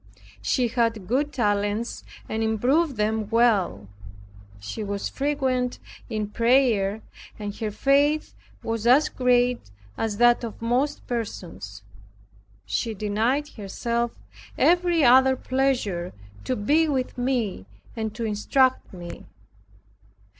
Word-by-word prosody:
She 245 - +1
had 230 -4 0
good 285 +5 0
talents 205 -1 -1 0.2
and 220 - -2
improved 250 +7 +1
them 215 0 0
well. 215 - +2 0.7
She 100 - -6
was 200 -1 -3
frequent 265 -3 -1 0.3
in 215 -3 -2
prayer 230 -4 +2 0.3
and 205 -1 -5
her 220 - -2
faith 285 +7 +2 0.3
was 225 0 -2
as 275 +6 +5
great 245 - +1 0.3
as 220 -2 -1
that 240 +1 +4
of 230 -2 -6
most 245 +5 -1
persons. 170 - -6 0.8
She 160 - -2
denied 225 +9 0
herself 235 +3 -3 0.4
every 345 -2 +3
other 260 +1 +6
pleasure 250 -10 -1 0.3
to 255 - 0
be 295 +10 +2
with 260 -3 -1
me 240 - -1 0.3
and 220 -1 -3
to 230 - -3
instruct 255 +5 +1
me. 175 -2 -9
235 Hz, 110 wpm, -25 LUFS, 210-260 Hz, 0.8 s, other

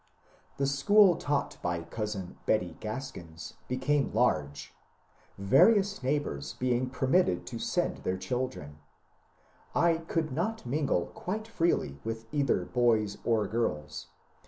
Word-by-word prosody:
The 140 - +1
school 180 +8 +5
taught 145 -2 -1
by 85 -1 -2
cousin 105 -1 -5
Betty 90 -6 +1
Craskins 105 -8 -7
became 135 +3 0
large, 75 -12 0 0.6
various 195 - +4
neighbours 130 - -2
being 125 0 0
permitted 130 - +1
to - - -6
send - - -1
their 95 - -2
children. 95 - -4 1.0
I 170 -1 +4
could 165 -2 -2
not 180 - -2
mingle 135 - 0
quite 215 +4 -4
freely 165 - 0
with 115 0 -4
either 140 -3 +1
boys 110 -5 +1
or 110 -3 +2
girls. 85 -11 -2
125 Hz, 115 wpm, -30 LUFS, 95-150 Hz, 1.0 s, school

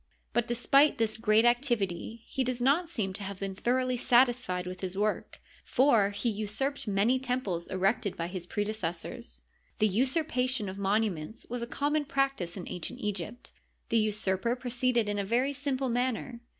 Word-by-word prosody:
But, 240 -1 +1
despite 275 +5 +4
this 220 -2 +1
great 220 0 +3
activity, 235 -4 0
he 265 - -1
does 250 -1 -1
not 290 +7 +2
seem 205 - -2
to 200 - -3
have 200 0 -5
been 195 -1 -3
thoroughly 255 +5 0
satisfied 240 -7 +3
with 180 0 -7
his 190 0 -4
work, 210 +1 -1 0.2
for 235 -7 +4
he 205 +4 -3
usurped 220 +6 -1
many 210 +6 +2
temples 250 -10 -2
erected 195 +2 0
by 165 - -2
his 175 0 -6
prede 205 +2 -2
cessors. 165 - -3 0.3
The 215 - +4
usurpation 255 - +1
of 190 +1 -7
monuments 200 -2 -1
was 245 -1 -3
a 235 - -3
common 295 +3 0
practice 275 -11 -1
in 180 - -6
ancient 175 - -5
Egypt. 210 +3 -4 0.4
The 230 - +3
usurper 215 +1 +1
proceeded 245 -2 0
in 205 0 -1
a - - 0
very 245 +7 +1
simple 275 -1 -1
manner. 245 0 -1
225 Hz, 165 wpm, -30 LUFS, 195-255 Hz, 0.4 s, despite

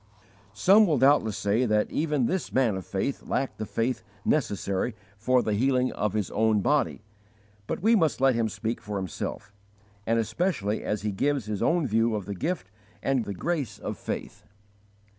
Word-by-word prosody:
Some 200 - +6
will 155 -4 +2
doubtless 130 -5 +4
say 110 +5 +1
that 105 -1 +1
even 150 -5 +1
this 185 +8 -2
man 125 -6 +2
of 95 - -6
faith 100 +8 -2
lacked 135 -3 -2
the 110 - -3
faith 115 0 -1 0.2
necessary 105 -5 0 0.2
for 125 +5 +2
the 110 - 0
healing 130 +3 +2
of 105 -1 -2
his 105 -3 -1
own 110 -1 +2
body; 145 +6 +1 0.6
but - - -3
we 230 +2 +5
must 160 -10 +2
let 135 0 +4
him 115 -1 0
speak 115 +2 -3
for 105 -2 -4
himself, 95 +2 -5 0.5
and 115 +1 +2
especially 110 - -1
as 105 -1 -2
he 105 - 0
gives 140 +4 0
his 105 -2 -3
own 170 -2 +2
view 115 -1 +2
of 105 -3 -4
the 100 - -4
gift 150 - -3 0.3
and 135 -4 +1
the 100 - -5
grace 160 - -2
of - - -5
faith. - - -6
115 Hz, 180 wpm, -27 LUFS, 105-140 Hz, 0.6 s, Some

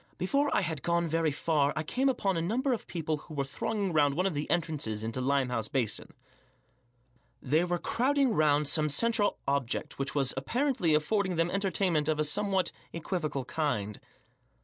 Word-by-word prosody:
Before 280 +10 +1
I - - +2
had 160 -6 -2
gone 170 +1 +1
very 165 0 +1
far 145 -1 +1
I 155 - -1
came 260 - +1
upon 200 -7 0
a 165 - 0
number 250 - 0
of 230 - -5
people 160 -3 -2
who 150 +1 -11
were 140 -1 -1
thronging 195 +6 -2
round 145 -2 +3
one 180 +4 +1
of 195 - +1
the 145 0 -3
entrances 150 -11 -1
into 115 +3 -3
Limehouse 125 -4 0
Basin. 120 -6 -2 1.2
They 150 +7 +2
were 175 0 0
crowding 265 +5 +1
round 150 -3 +3
some 150 0 +2
central 215 +6 +2
object 140 -3 -1
which 135 +1 -2
was 135 -3 +2
apparently 185 - +1
affording 185 +4 +1
them 165 +1 +1
entertainment 185 -5 +1
of 155 -1 0
a - - +3
somewhat 190 +3 +1 0.2
equivocal 155 -5 -3
kind. 105 -8 -2
160 Hz, 170 wpm, -30 LUFS, 140-195 Hz, 1.2 s, round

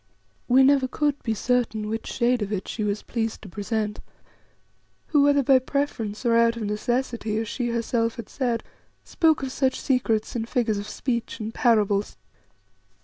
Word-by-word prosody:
We 260 +2 +6
never 270 -1 +4
could 290 +2 -1
be 225 -2 -1
certain 225 -2 0
which 225 +1 -4
shade 245 -1 +1
of 205 0 -3
it 195 -3 -3
she 215 - -3
was 205 0 -2
pleased 225 -2 -3
to 200 - -9
present, 210 +2 -3 1.1
who, 295 -3 +4
whether 285 0 +4
by 265 0 +5
preference 255 -5 -3
or 230 -1 +4
of 230 0 +3
necessity, 225 +1 -1
as 225 0 -2
she 240 +2 -2
herself 230 0 0
had 230 -4 -7
said, 245 -4 -2 0.4
spoke 320 -3 +2
of 265 - -3
such 260 0 0
secrets 230 -5 0
in 225 -2 -1
figures 230 -3 0
of 205 +1 -6
speech 235 0 -3
and 220 +1 -5
parables. 210 -5 +2
230 Hz, 165 wpm, -25 LUFS, 215-260 Hz, 1.1 s, We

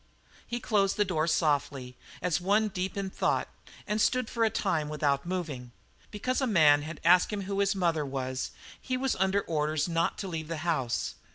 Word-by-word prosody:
He 240 0 -3
closed 200 -4 +1
the 210 - +3
door 165 -4 0
softly, 140 -5 0 0.3
as 180 -1 +1
one 210 +4 +2
deep 190 0 -3
in 195 -1 -3
thought, - - 0 0.4
and 210 +1 0
stood 255 0 +1
for 230 - 0
a 225 - +4
time 160 -9 -1
without 145 0 0
moving. 150 -10 -4 0.4
Because 255 +6 -2
a 265 - +1
man 155 -8 +5
had 155 +2 -7
asked 180 +4 +5
him 205 -1 -2
who 195 +1 -3
his 200 0 +2
mother 170 -5 +1
was, 130 -2 -3 0.3
he 255 -1 -2
was 265 0 0
under 190 +2 +2
orders 155 -2 -1
not 165 -1 0
to 195 - -4
leave 160 -3 -4
the 165 0 -4
house. 135 -8 -1
175 Hz, 190 wpm, -29 LUFS, 150-200 Hz, 0.4 s, man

